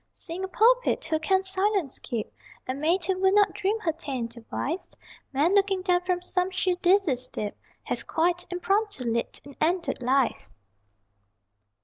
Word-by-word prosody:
Seeing 350 +2 -6
a - - -1
pulpit, - - +3
who 315 - 0
can 380 +4 +2
silence 380 -4 0
keep? 225 -3 -5 0.3
A 255 - -1
maid, 325 +6 +1
who 375 0 0
would 380 +1 +3
not 410 -1 +4
dream 420 +2 -1
her 330 - +1
ta'en 275 -7 -4
to 235 0 -13
wife? 330 +7 -3 0.4
Men 295 +7 +2
looking 390 -2 +2
down 360 -2 +3
from 360 -1 -1
some 360 0 0
sheer 370 -1 +1
dizzy 360 -5 +3
steep 240 -4 -4 0.3
Have - - -4
(quite 350 +2 0
impromptu) 395 -2 0
leapt, 230 +3 -2
and 285 -1 -12
ended 340 -2 0
life. 245 - 0
355 Hz, 160 wpm, -26 LUFS, 280-385 Hz, 0.4 s, not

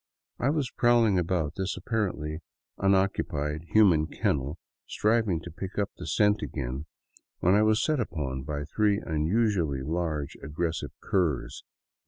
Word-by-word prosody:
I 130 - +2
was 145 -4 0
prowling 120 -5 +4
about 85 -3 0
this 95 0 -2
apparently 85 -9 -2 0.4
unoccupied 95 -6 +1
human 90 -8 +5
kennel, 70 +1 -1 0.3
striving 110 -5 +1
to - - -9
pick 95 +5 -7
up 100 -1 0
the - - -8
scent 105 -1 +3
again, 70 +1 -4 0.5
when 90 - +4
I 105 - +5
was 110 +2 +3
set 155 -3 +1
upon 75 - -3
by 75 +1 -4
three 105 +6 +2
unusually 80 - 0
large, 80 -2 -2
aggressive 80 +3 -3
curs. 85 -9 -1
90 Hz, 135 wpm, -28 LUFS, 75-105 Hz, 0.5 s, human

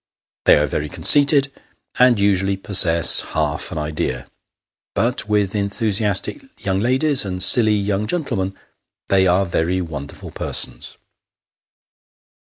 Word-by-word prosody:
They - - +4
are 75 - -1
very 75 +1 -6
conceited, 140 - +4 0.5
and 125 -3 +2
usually 100 -1 -1
possess 90 -4 +5
half - - -5
an - - -8
idea; 75 -5 -6 0.6
but, 120 -2 -3
with 105 -2 -2
enthusiastic 105 - -2 0.2
young 95 -1 -2
ladies, 130 +5 +1
and 90 -2 -4
silly 110 +1 +6
young 100 0 -4
gentlemen, 110 - -5 0.5
they 95 -1 +1
are 90 +2 0
very 85 +1 -3
wonderful 75 -5 -10
persons. - - -3
100 Hz, 115 wpm, -17 LUFS, 90-115 Hz, 0.6 s, silly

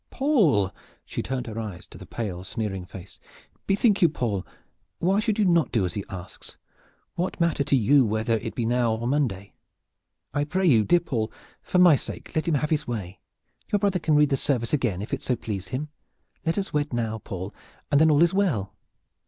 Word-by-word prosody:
"Paul!" 180 - +2 0.3
she - - -4
turned 130 -1 -3
her 115 -1 -5
eyes 105 -5 -6
to - - -14
the - - -11
pale 95 -6 -4
sneering 95 -2 -4
face. 90 0 -12 0.5
"Bethink 200 +1 +3
you, 170 - +6
Paul! 110 -10 -2 0.5
Why 190 +4 +2
should 215 -1 0
you 215 - +3
not 170 -3 +3
do 110 -5 +2
what 90 -2 -2
he 100 - -3
asks? 90 -1 -9 0.6
What 180 +2 -3
matter 170 -4 +2
to 140 - +2
you 135 +3 +5
whether 110 +1 0
it 115 +1 -6
be 120 - -1
now 120 -1 +2
or 115 - -6
on 120 - 0
Monday? 115 -9 -1 0.8
I 145 0 +1
pray 185 +6 -1
you, 120 -10 +5
dear 175 +7 +4
Paul, 115 -9 -2 0.3
for - - -1
my 180 -4 +8
sake - - -7
let 155 +2 -1
him 165 - +2
have 150 +2 -1
his 150 -1 0
way! 105 -6 -5 0.5
Your 205 - +4
brother 195 -2 +1
can 155 -2 +2
read 150 -1 +4
the 135 - +3
service 125 -3 -1
again 115 -10 0
if - - -7
it - - -1
so 125 - 0
please 105 -5 -5
him. 140 +8 -4 0.6
Let 165 - +1
us 195 -1 -2
wed 145 -2 0
now, 110 -2 -1
Paul, 95 -1 -6 0.4
and 145 +1 +5
then 160 - +6
all 150 +1 +5
is 170 - +3
well." 155 - 0
130 Hz, 210 wpm, -25 LUFS, 110-165 Hz, 0.8 s, my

